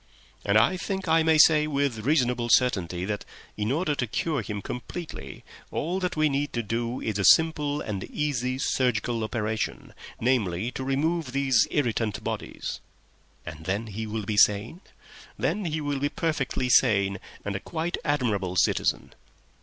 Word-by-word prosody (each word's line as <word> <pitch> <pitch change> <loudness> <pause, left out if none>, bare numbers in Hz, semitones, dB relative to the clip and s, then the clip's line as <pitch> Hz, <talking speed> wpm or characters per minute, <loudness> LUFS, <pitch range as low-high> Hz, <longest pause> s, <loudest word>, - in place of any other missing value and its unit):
"And - - +3
I 185 - +4
think 190 +1 -4
I 160 0 +4
may 160 0 +4
say 155 -1 +6
with 140 -5 0
reasonable 125 -2 +1
certainty 95 -9 +2
that, 105 0 -3 0.3
in 105 +2 -1
order 155 +1 +1
to 125 -3 -2
cure 150 +5 -1
him 105 -1 -5
complete, 155 +8 -6 0.6
all 175 +5 -2
that 180 -2 -2
we 155 0 +4
need 145 0 -1
to 120 - -1
do 115 +3 -2
is 105 -2 -2
a - - +1
simple 150 - +4
and 100 -3 -4
easy 130 -4 -2
surgical 120 -3 0
operation—namely, 110 -1 -2
to 130 - -5
remove 140 +1 -1
these 135 -4 +3
irritant 115 -6 -1
bodies." - - -4 0.7
"And 80 -1 -8
then 100 +5 -1
he 110 +1 -5
will 110 -1 -4
be 105 +1 -2
sane?" 105 - +3 0.6
"Then 210 -2 -1
he 155 -1 -2
will 145 -2 -2
be 145 +1 0
perfectly 145 -6 -1
sane, 100 -6 +3 0.3
and 100 -1 -2
a - - -2
quite 165 +6 -3
admirable 110 - 0
citizen." - - +1
125 Hz, 155 wpm, -26 LUFS, 105-150 Hz, 0.7 s, say